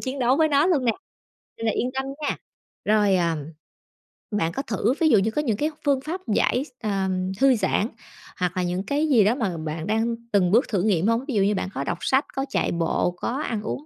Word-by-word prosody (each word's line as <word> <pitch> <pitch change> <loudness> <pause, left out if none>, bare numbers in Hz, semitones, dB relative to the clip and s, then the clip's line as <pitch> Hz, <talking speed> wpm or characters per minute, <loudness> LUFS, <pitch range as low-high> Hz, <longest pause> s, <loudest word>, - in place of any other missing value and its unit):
chiến 265 +1 -4
đấu 250 +1 +3
với 315 0 +3
nó 285 +3 +3
luôn 300 -9 +2
nè, 230 - +3 0.7
nên 225 - -3
là 220 - +2
yên 250 - -1
tâm 265 0 -1 0.2
nha. 290 - -1 0.5
Rồi, 205 -2 +3
à, 170 -2 +1 1.0
bạn 170 -6 0
có - - -2
thử 225 +2 0
ví 315 - +5
dụ 220 - +6
như 220 +3 0
có 300 - 0
những 225 -8 -1
cái 300 - 0 0.2
phương 275 -2 +2
pháp 345 +6 -5
giải 250 +5 +2
x - - -16
ờ, 195 -3 0 0.3
thư 270 -2 +5
giãn, 215 0 +1 0.5
hoặc 180 -1 -1
là 180 - +1
những 180 +2 -2
cái 295 +6 0
gì 230 -7 +5
đó 220 +5 +3
mà 195 -10 -2
bạn 160 +2 -4
đang 225 +2 +1 0.2
từng 185 -3 +3
bước 235 +5 +4
thử 195 -5 0
nghiệm 195 -2 +2
hông? 230 +3 +1
Ví 275 - -3
dụ 200 - +3
như 205 +1 +2
bạn 190 - -2
có 135 - -3
đọc 170 - -2
sách, 265 +2 +2
có 270 0 -1
chạy - - 0
bộ, 170 +1 0
có - - -3
ăn 220 -3 -2
uống, 270 +7 -5
220 Hz, 245 wpm, -24 LUFS, 190-270 Hz, 1.0 s, dụ